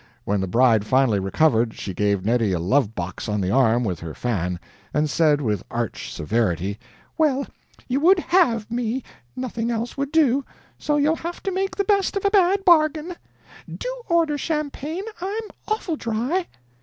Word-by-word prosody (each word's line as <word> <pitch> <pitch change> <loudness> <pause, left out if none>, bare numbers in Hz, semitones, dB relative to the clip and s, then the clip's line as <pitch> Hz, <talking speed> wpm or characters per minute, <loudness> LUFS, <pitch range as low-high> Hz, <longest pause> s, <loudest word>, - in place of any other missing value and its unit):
When 100 -1 0
the 95 - -2
bride 115 +1 +4
finally 125 -2 +2
recovered, 115 +3 +2
she 95 - -5
gave 100 0 0
Neddy 115 -3 +2
a 85 - 0
love 110 +5 +1
box 90 +4 -5
on 105 0 0
the 95 -1 0
arm 125 -1 +3
with 95 -6 -2
her 80 -2 -7
fan, 90 -7 -2 0.4
and 150 +1 +2
said 150 -1 +2
with 105 -7 -1
arch 120 -2 -4
severity: 100 +1 -1 0.4
"Well, 280 -3 +2 0.4
you 260 +2 0
would 365 +6 +5
HAVE 250 - +2
me 240 +1 -2 0.3
nothing 235 -2 -3
else 235 +2 -3
would 280 0 -2
do 280 -4 +3 0.4
so 295 0 0
you'll 300 +3 +2
have 340 +1 -6
to 390 - -1
make 385 +1 -2
the 400 - +1
best 400 -1 +1
of 395 - -3
a 400 - +3
bad 390 -1 +3
bargain. 315 0 +4 0.6
DO - - -5
order 335 -3 +2
the - - -1
champagne, 305 +3 -3 0.2
I'm 405 +5 -3 0.2
Oful 390 -7 -2
dry." 245 +11 -1
230 Hz, 175 wpm, -23 LUFS, -, 0.6 s, would